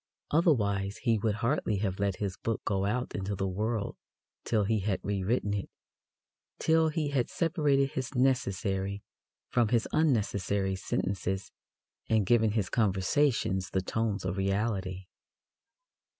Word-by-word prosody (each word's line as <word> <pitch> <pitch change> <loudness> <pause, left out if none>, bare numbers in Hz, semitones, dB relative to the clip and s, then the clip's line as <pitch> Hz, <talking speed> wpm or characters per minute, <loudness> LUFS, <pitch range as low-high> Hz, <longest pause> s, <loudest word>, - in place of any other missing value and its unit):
Otherwise 105 - +2
he 115 -4 +3
would 105 0 0
hardly 115 -5 +1
have 95 -1 -2
let 100 -1 +1
his 100 -2 -3
book 115 -1 -2
go 100 -1 0
out 120 +5 -1
into 100 +1 -2
the 95 0 -1
world 105 +3 -2 0.5
till 110 -3 +1
he 110 +2 +1
had 100 0 -1
rewritten 100 +2 0
it 100 -2 -3 0.9
till 160 0 +3
he 155 -1 -1
had 130 -4 0
separated 150 -5 +1
his 130 +1 -4
necessary 100 -6 0 0.5
from 120 -2 +3
his 115 +1 +1
unnecessary 100 - +1
sentences 95 0 -2 0.6
and 110 -3 +3
given 110 0 +3
his 105 -5 0
conversations 105 - +1
the 95 - 0
tones 105 -1 -1
of 90 +1 -2
reality. 95 -1 -1
105 Hz, 135 wpm, -30 LUFS, 95-120 Hz, 0.9 s, he